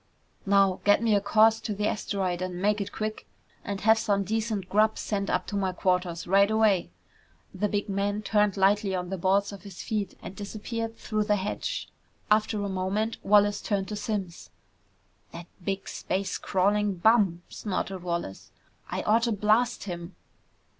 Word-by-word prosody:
"Now 195 -2 +4
get 205 +2 +4
me 225 -2 +3
a 200 - +3
course 220 +2 +4
to 210 - -4
the 210 +1 -1
asteroid 190 -4 -2
and 180 -1 -4
make 205 +2 +1
it 200 - -4
quick. 215 0 -4 0.4
And 200 -1 -4
have 220 +1 +5
some 200 -3 +1
decent 215 -2 -2
grub 215 +2 +2
sent 200 -2 -2
up - - 0
to 205 - -5
my 190 -2 0
quarters 180 -2 0
right 195 +3 +4
away!" 220 -4 +2 0.6
The 205 +2 -1
big 205 +1 -1
man 205 +1 -1
turned 210 -2 +2
lightly 195 0 +3
on 180 0 -4
the 190 - -2
balls 195 +3 +2
of 200 - -9
his 200 -3 -9
feet 210 -3 -3
and 190 - -8
disappeared 225 +2 -5
through 215 -2 -2
the 210 - +3
hatch. 200 +1 -3 0.4
After 215 -1 +2
a - - -1
moment, 195 +4 -1
Wallace 205 0 +4
turned 195 -2 -1
to 210 - -3
Simms. 205 -6 -4 0.8
"That 170 - -8 0.2
big 195 +1 -3
space 190 0 -3
crawling 200 +1 +1
bum!" 190 -3 +3
snorted 195 -2 -3
Wallace. 170 - -4 0.4
"I - - -3
oughta 230 +2 +2
blast 215 +4 +2
him!" 175 -2 -7
200 Hz, 165 wpm, -27 LUFS, 190-215 Hz, 0.8 s, have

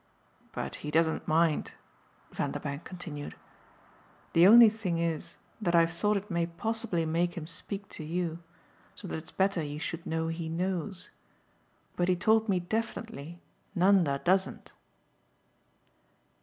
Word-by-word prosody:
But 65 - -5
he 150 - -5
doesn't 160 +1 +1
mind," 160 0 +2 0.6
Vanderbank 140 +2 -3
continued. 165 -6 -7 1.0
"The 170 +2 +7
only 230 +2 +10
thing 210 -6 -1
is 165 -2 -2 0.2
that 175 -4 +1
I've 165 -1 +4
thought 210 +4 +1
it 200 +1 -6
may 170 -1 +1
possibly 175 -1 -2
make 170 +2 0
him 160 - -4
speak 195 +4 -5
to - - -5
you, 165 +1 -2 0.6
so 200 - -8
that - - -3
it's 160 - -11
better 190 -2 +1
you 145 -1 -4
should 165 +1 -5
know 160 0 -1
he 165 0 -4
knows. 180 +2 -3 0.8
But 175 - +1
he 185 - +3
told 220 +4 +3
me 185 -2 +3
definitely 215 -4 -4 0.3
Nanda 180 -6 +4
doesn't." 190 +1 +1
175 Hz, 135 wpm, -30 LUFS, 165-195 Hz, 1.0 s, only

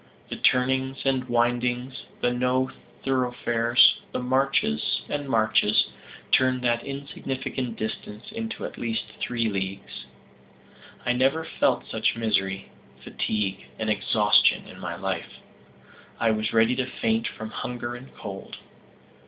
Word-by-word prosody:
The - - -2
turnings 130 +1 +2
and 130 -2 +1
windings, 120 +2 0 0.2
the 125 - +2
no 125 +1 +1 0.3
thoroughfares, 125 -2 +3
the - - -2
marches 130 - +1
and 145 -1 -3
marches, 110 -2 +3 0.4
turned 130 -1 +3
that 120 -1 +2
insignificant 135 -3 -4
distance 110 - -5
into 225 0 -4
at - - -7
least 115 -1 -1 0.2
three 115 -2 0
leagues. 95 -1 -4 1.0
I 125 - +3
never 135 +6 +2
felt - - +1
such - - +1
misery, 95 -4 -1 0.3
fatigue 100 -3 -2
and 110 -1 0
exhaustion 105 0 +3
in - - -12
my - - -4
life. - - -3 0.8
I 115 -1 +3
was 110 0 0
ready 115 +2 +4
to 130 -1 0
faint 115 -2 0
from 110 0 -7
hunger 120 +3 -4
and 125 +2 -10
cold. 100 -2 -7
120 Hz, 125 wpm, -26 LUFS, 110-130 Hz, 1.0 s, ready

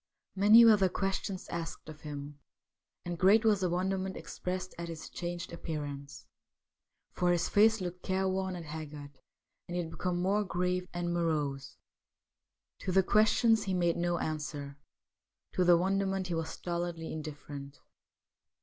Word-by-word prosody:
Many 210 +4 +8
were 220 -2 +8
the 190 -2 +3
questions 195 0 -2
asked 165 -2 -5
of 155 -1 -10
him, 145 -1 -7 0.7
and 175 -1 -4
great 210 +4 +5
was 210 -3 +4
the 180 - +1
wonderment 190 +2 -1
expressed 185 0 -5
at 170 - -4
his 165 -1 -7
changed 175 0 -5
appearance; 145 -4 -6 0.9
for 180 0 +1
his 175 -1 +1
face 220 +2 +5
looked 180 0 -5
careworn 190 0 -1
and 170 -2 -7
haggard, 150 -2 -8 0.5
and 175 - -5
he 175 - 0
had 165 - -8
become 180 0 -2
more 200 +4 +2
grave 180 -1 -1
and 175 0 -2
morose. 150 -5 -1 1.0
To 185 - -3
the 190 +1 +4
questions 220 +3 +4
he 190 -1 0
made 175 -2 +2
no 175 0 0
answer; 145 -3 -4 0.7
to 185 - +1
the 175 -1 +6
wonderment 195 +1 0
he - - -1
was 165 -1 -2
stolidly 170 -1 -4
indifferent. 145 -2 -7
175 Hz, 150 wpm, -31 LUFS, 160-190 Hz, 1.0 s, Many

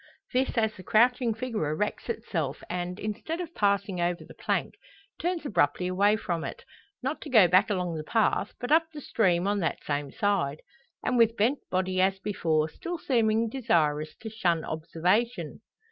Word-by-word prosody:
This 255 0 0
as 220 -1 +2
the 185 - -11
crouching 240 +4 +3
figure 225 -9 -2
erects 210 +10 -2
itself 165 - -3
and, 180 +2 -3
instead 215 - -4
of 340 -2 -5
passing 200 -2 +1
over 175 0 -1
the - - -13
plank, - - -1 0.5
turns 345 -2 -2
abruptly 180 - +1
away 200 +3 +3
from 170 -6 -3
it. 485 - -7 0.4
Not 270 +4 -2
to 300 - -7
go 220 -8 +7
back 185 +5 +4
along 180 -4 -1
the 155 - -4
path, 215 +2 +1
but 245 - -4
up 320 +1 +5
the 305 - -8
stream 185 -9 +1
on 205 0 +1
that 165 -6 -2
same 145 -1 -2
side! 200 -9 0 0.4
And 250 - +1
with 230 0 +4
bent 240 +7 +2
body 185 0 0
as 190 +1 +2
before, 165 -6 0
still 345 - -6
seeming 230 -6 +2
desirous 160 - 0
to 220 - -5
shun 175 -7 0
observation. 180 +9 -1
205 Hz, 175 wpm, -28 LUFS, 175-235 Hz, 0.5 s, go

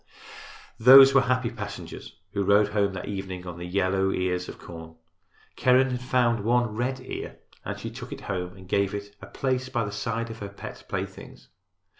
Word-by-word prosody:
Those 135 +3 +10
were 135 - +6
happy 125 -2 0
passengers 115 - -8 0.2
who 100 -1 0
rode 100 +1 +4
home 100 -2 +1
that 95 - -6
evening 95 -2 -5
on 85 -1 -7
the 90 - -6
yellow 95 +1 +1
ears 90 -1 -1
of - - -9
corn. 80 -1 -10 0.6
Keren 130 +1 +4
had 125 0 -3
found 120 -4 +1
one 120 0 +2
red 130 +3 -1
ear - - -7 0.3
and - - -5
she - - -6
took - - -9
it - - -7
home 90 -1 -4
and 95 -1 -13
gave 100 +1 +1
it 100 0 -7
a - - -9
place 130 -1 -2
by 120 -4 -1
the 105 - -5
side 115 +2 -3
of 115 - -9
her 100 - -6
pet 100 - -10
playthings. - - -6
105 Hz, 190 wpm, -26 LUFS, 95-125 Hz, 0.6 s, Those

